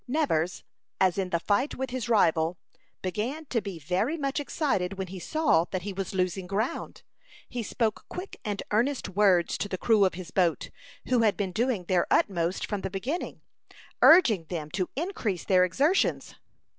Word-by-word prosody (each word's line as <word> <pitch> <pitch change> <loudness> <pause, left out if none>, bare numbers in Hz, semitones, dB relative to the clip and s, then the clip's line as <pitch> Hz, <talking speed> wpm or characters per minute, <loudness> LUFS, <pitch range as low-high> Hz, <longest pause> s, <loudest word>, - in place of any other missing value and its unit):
Nevers, 245 - 0 0.4
as 190 0 +3
in 190 -1 -1
the 170 - 0
fight 205 - 0
with 265 0 -4
his 250 -2 -3
rival, 165 -6 +3 0.5
began 235 - -3
to 230 - +1
be 195 -3 -6
very 185 - -1
much 275 -1 -1
excited 270 - -1
when 190 - -2
he 190 0 -7
saw 240 - +2
that 185 -1 -4
he 200 0 -4
was 195 +1 -4
losing 185 0 -1
ground. 210 +6 -3 0.4
He 245 - -4
spoke 220 0 -2
quick 365 +2 -7
and 205 -2 -3
earnest 245 +6 +1
words 185 -3 +3
to 205 - -2
the 185 - -3
crew 215 +1 +3
of 185 -3 +2
his 180 -1 -8
boat, 175 -4 +1 0.4
who 250 - +3
had 220 -3 +3
been 195 -3 -2
doing 230 -1 0
their 175 0 +1
utmost 175 -2 +1
from 205 -2 -3
the - - -3
beginning, 240 - -4 0.6
urging 245 - +6
them 155 -3 -5
to 185 -1 -2
increase 260 - -2
their 185 -2 +4
exertions. 280 - +1
200 Hz, 175 wpm, -27 LUFS, 180-250 Hz, 0.6 s, urging